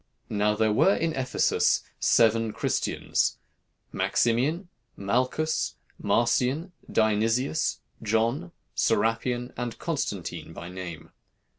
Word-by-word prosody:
"Now 105 0 +2
there 110 0 +2
were 195 - +4
in 165 -1 0
Ephesus 130 -2 +2 0.2
seven 115 -1 +3
Christians, - - 0 0.5
Maximian, 140 - +1 0.3
Malchus, 130 +10 0 0.3
Marcian, 125 - +1 0.2
Dionysius, 115 +7 +1 0.2
John, 115 +10 0 0.2
Serapion, 115 +3 0
and 120 -1 -4
Constantine - - -3
by 85 - -8
name. 90 -4 -8
115 Hz, 90 wpm, -27 LUFS, 110-130 Hz, 0.5 s, were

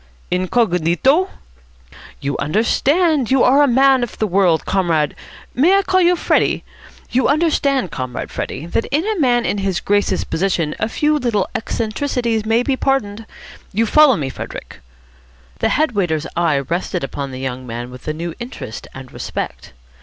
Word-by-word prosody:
"Ingognito?" 185 - +2 0.9
"You 140 0 -2
understand. 265 - +2
You 265 -1 +4
are 275 +3 +5
a 290 - +5
man 265 +1 +4
of 240 - -4
the 220 - 0
world, 180 -6 +2
Comrade 165 -6 +1 0.4
may 345 +10 +4
I 395 - +2
call 375 -1 +2
you 355 0 +4
Freddie? - - +1 0.5
You 255 +1 +2
understand, 280 - +1
Comrade 130 -1 -5
Freddie, 155 - -5
that 170 +6 -1
in 305 +6 -1
a 430 -3 -1
man 245 -4 +2
in 205 - -1
his 195 -2 -1
Grace's 205 0 +1
position 170 -4 -1
a 220 - -1
few 300 +4 +1
little 225 -7 0
eccentricities 230 0 -2
may 225 +2 +3
be 270 +1 0
pardoned. 225 -6 -1 0.5
You 225 +4 +2
follow 295 +2 +6
me, 140 -3 -3
Frederick?" - - -8 0.8
The - - +1
head 310 -2 +2
waiter's 175 -7 -1
eye 165 -4 +2
rested 170 +4 -2
upon 140 0 -4
the 130 - -7
young 130 -1 -5
man 120 +1 -6
with 125 +3 -12
a 155 - -1
new 170 +1 -4
interest 150 - -7
and 130 -1 -10
respect. - - -6
215 Hz, 160 wpm, -18 LUFS, 165-270 Hz, 0.9 s, follow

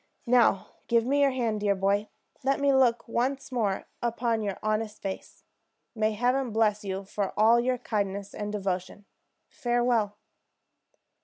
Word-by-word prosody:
And 235 - -5
now 230 -6 +4 0.2
give 230 -1 +3
me 285 +3 +2
your 280 - +5
hand, 235 -5 -1
dear 205 -1 +1
boy. 200 +2 0 0.3
Let 275 +2 +1
me 280 -1 +3
look 245 -3 +3
once 265 +4 -1
more 215 -6 -1 0.2
upon 235 -1 0
your 200 -2 -3
honest 215 0 -1
face. 195 -1 -7 0.5
May 215 -1 0
Heaven 250 +4 +1
bless 215 -1 +1
you 195 0 -4
for 200 0 -3
all 225 +3 +6
your 250 +1 +1
kindness 200 -3 -3
and 210 0 -4
devotion! 195 0 -3 0.4
Farewell!" 240 -4 0
220 Hz, 150 wpm, -28 LUFS, 205-245 Hz, 0.5 s, all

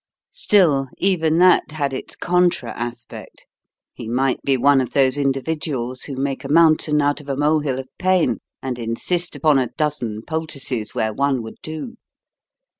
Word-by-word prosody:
Still, 180 - +3
even 165 -4 +1
that 180 -3 +4
had 140 -3 -2
its 130 - -6
contra 175 -9 +1
aspect. 120 -1 -8 0.5
He 115 - -8
might 130 +2 0
be 135 -1 +1
one 140 +1 +4
of 125 - -5
those 135 -1 +3
individuals 135 -2 -2
who 140 - -6
make 135 0 -3
a 135 - -6
mountain 155 -1 +4
out 145 +1 0
of 145 - -13
a 135 - -2
molehill 145 -2 +1
of 130 0 -6
pain, 180 -10 +2 0.2
and 130 -2 -4
insist 170 +10 -2
upon 150 -4 +3
a 125 -3 -1
dozen 125 -8 -2
poultices 140 -8 -4
where 110 -1 0
one 135 0 0
would 110 - -9
do. 160 +10 -7
140 Hz, 160 wpm, -21 LUFS, 130-160 Hz, 0.5 s, that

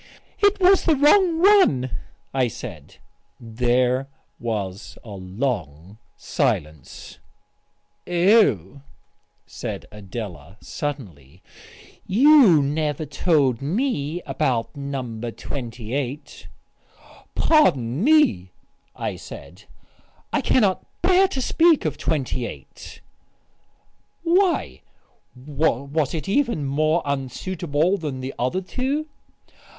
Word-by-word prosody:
"It 405 0 +3
was 380 +1 +4
the 320 - +4
wrong 325 +4 +4
one," 260 - +4 0.4
I 130 -2 +2
said.... 115 - -9 0.4
There 125 +3 0 0.3
was 100 -6 -5
a 110 - -11
long 95 - -4 0.2
silence. 75 -3 -3 0.9
"Oh," 170 - +3 0.6
said - - -6
Adela 100 - -8
suddenly, 95 - -7 0.6
"you 235 - +6
never 150 +1 -2
told 140 -8 +1
me 170 - -2
about 130 -3 -1
No. 135 -5 -5
28." 125 +3 -6 0.9
"Pardon 140 - +2
me," 225 - +3 0.4
I - - -4
said, - - -12 0.7
"I - - +2
cannot 205 -7 +2 0.2
bear 370 +2 +5
to 270 - -4
speak 330 - +3
of 155 - -2
28." 130 -5 -4 1.2
"Why, 355 +2 +1 0.5
was 140 +2 -1
it 155 - -5
even 215 - 0
more 155 +4 +1
unsuitable 155 +5 -1
than 140 -5 -5
the 130 +1 -5
other 130 +10 -1
two?" 270 +10 -3
140 Hz, 90 wpm, -22 LUFS, -, 1.2 s, you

